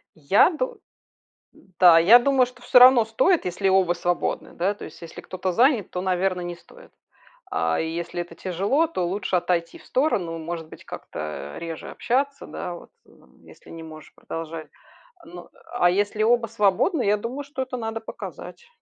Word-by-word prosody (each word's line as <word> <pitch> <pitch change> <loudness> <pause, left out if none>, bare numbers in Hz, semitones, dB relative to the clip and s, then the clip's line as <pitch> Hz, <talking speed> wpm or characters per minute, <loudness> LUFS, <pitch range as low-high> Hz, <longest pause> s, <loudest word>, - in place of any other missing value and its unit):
Я 160 - +4
ду 475 +7 -4 1.0
да, 175 -3 +8
я 210 +9 +8
думаю, 265 0 +3
что 250 0 -15
всё 250 - +5
равно 250 -2 +8
стоит, 310 +11 +2
если 185 +2 0
оба 190 -2 +3
свободны, 175 0 -2
да. 190 +4 0
То 205 - -12
есть, 155 - -13
если 170 - -10
кто-то 185 0 -4
занят, 245 - +3
то, 180 - -4
наверно, 185 0 0
не 175 0 -5
стоит. - - -18 0.6
А 80 0 0
если 170 +2 -3
это 170 -1 -10
тяжело, 200 - 0
то 185 - -2
лучше 190 +1 -2
отойти 175 -1 -1
в - - -19
сторону, 190 - 0
может 165 0 -6
быть, - - -14
как-то 75 -2 -7
реже 165 -1 -7
общаться, 275 +3 -1
да 175 - -6
вот, - - -14 0.2
м, - - -23
если - - -17
не 165 0 -9
можешь 155 -1 -12
продолжать. 165 -1 -7 0.6
Ну, 340 +2 -11 0.3
а 175 -8 +3
если 205 +3 0
оба 235 +1 +3
свободны, 220 - +1
я 205 +1 +3
думаю, 245 +7 -5
что 280 -1 -6
это 260 -1 -6
надо 225 -1 -4
показать 470 - -9
190 Hz, 170 wpm, -24 LUFS, 170-245 Hz, 1.0 s, да